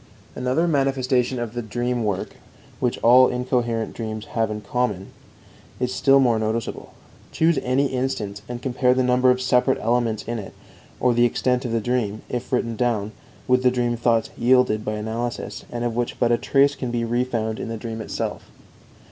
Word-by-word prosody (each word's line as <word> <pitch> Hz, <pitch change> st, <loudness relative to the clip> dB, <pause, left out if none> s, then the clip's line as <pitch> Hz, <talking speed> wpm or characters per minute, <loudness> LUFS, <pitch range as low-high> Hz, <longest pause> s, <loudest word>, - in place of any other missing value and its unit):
Another 130 Hz, +7 st, 0 dB
manifestation 135 Hz, -4 st, +1 dB
of 120 Hz, -2 st, -4 dB
the 120 Hz, -, -3 dB
dream 120 Hz, +2 st, -2 dB
work 105 Hz, -3 st, -3 dB, 0.4 s
which 125 Hz, -2 st, 0 dB
all 125 Hz, +2 st, +7 dB
incoherent 125 Hz, -2 st, -1 dB
dreams 110 Hz, -2 st, -5 dB
have 115 Hz, -1 st, +1 dB
in 105 Hz, 0 st, -4 dB
common 105 Hz, -3 st, -2 dB, 0.7 s
is 125 Hz, 0 st, -1 dB
still 135 Hz, 0 st, +4 dB
more 120 Hz, -4 st, +3 dB
noticeable. 110 Hz, +1 st, -3 dB, 0.4 s
Choose 160 Hz, -2 st, +2 dB
any 130 Hz, +3 st, +1 dB
instance, 125 Hz, -7 st, -2 dB
and 120 Hz, 0 st, -6 dB
compare 125 Hz, -1 st, +2 dB
the 130 Hz, -, +2 dB
number 125 Hz, 0 st, +3 dB
of 125 Hz, 0 st, +3 dB
separate 130 Hz, +1 st, +2 dB
elements 115 Hz, -1 st, 0 dB
in 120 Hz, 0 st, -4 dB
it, 100 Hz, -, -9 dB, 0.4 s
or 125 Hz, -1 st, +3 dB
the 120 Hz, +1 st, +4 dB
extent 125 Hz, +1 st, 0 dB
of 120 Hz, -, -2 dB
the 115 Hz, -, +1 dB
dream, 110 Hz, -3 st, -1 dB
if 125 Hz, 0 st, -4 dB
written 115 Hz, -2 st, 0 dB
down, 110 Hz, -3 st, 0 dB, 0.4 s
with 125 Hz, 0 st, +3 dB
the 130 Hz, -, +4 dB
dream 120 Hz, -1 st, 0 dB
thoughts 115 Hz, -1 st, +1 dB
yielded 125 Hz, -3 st, +3 dB
by 105 Hz, -, -2 dB
analysis, 110 Hz, +3 st, -4 dB
and 120 Hz, 0 st, -3 dB
of 120 Hz, -2 st, -1 dB
which 120 Hz, 0 st, -2 dB
but 120 Hz, -1 st, +2 dB
a 120 Hz, -, +4 dB
trace 140 Hz, 0 st, +3 dB
can 130 Hz, -3 st, -4 dB
be 120 Hz, -1 st, -1 dB
refound 115 Hz, -2 st, -1 dB
in -, -, -4 dB
the 115 Hz, -, -4 dB
dream 110 Hz, 0 st, -5 dB
itself. -, -, -4 dB
120 Hz, 180 wpm, -23 LUFS, 115-125 Hz, 0.7 s, all